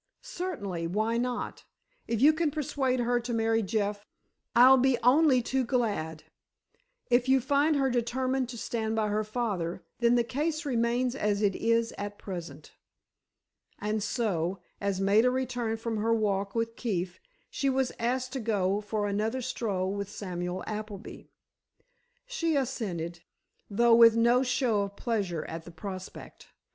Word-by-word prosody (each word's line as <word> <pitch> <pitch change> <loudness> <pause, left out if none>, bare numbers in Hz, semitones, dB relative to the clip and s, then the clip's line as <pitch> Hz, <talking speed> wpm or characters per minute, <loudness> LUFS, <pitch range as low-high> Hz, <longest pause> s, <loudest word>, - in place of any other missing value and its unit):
"Certainly. 280 - -4
Why 215 +6 0
not? 245 0 -3 0.4
If 230 -1 -1
you 305 +2 +8
can 315 0 +1
persuade 270 -4 -1
her 240 0 +1
to 240 0 -4
marry 225 0 +2
Jeff, 205 0 -1 0.5
I'll 255 +2 +8
be 260 -1 +3
only 260 0 +5
too 265 +2 0
glad. 210 - -1 0.9
If 245 +1 +3
you 265 0 +5
find 285 +4 +2
her 270 -2 +2
determined 255 +2 0
to 240 - -7
stand 220 -1 -2
by 215 -1 +1
her 210 +1 0
father, 205 -7 -3 0.2
then 235 0 +4
the 240 - +3
case 300 +6 -2
remains 245 -1 +1
as 210 -5 0
it 200 -2 +2
is 230 0 +1
at 205 0 -5
present." 165 -6 -8 1.1
And 210 +1 -2
so, 195 -6 -1 0.2
as 200 -2 -1
Maida 205 +5 +4
returned 245 -3 -2
from 225 -1 -3
her 225 +2 +2
walk 200 -2 -1
with 230 0 -1
Keefe, 185 -6 -3 0.3
she 275 - 0
was 265 -1 +1
asked 250 +2 -1
to 270 - -2
go 205 -3 0
for 210 0 -2
another 220 +5 -1
stroll 200 -6 -2
with 200 -1 -4
Samuel 180 -3 -4
Appleby. 215 -1 -7 1.0
She 335 -11 -1
assented, 190 - -2 0.5
though 235 +3 +4
with 230 -1 +8
no 235 +2 +4
show 245 -4 +1
of 200 0 -4
pleasure 200 -10 -2
at 165 0 -6
the 175 - -11
prospect. 185 +3 -9
230 Hz, 150 wpm, -29 LUFS, 200-250 Hz, 1.1 s, you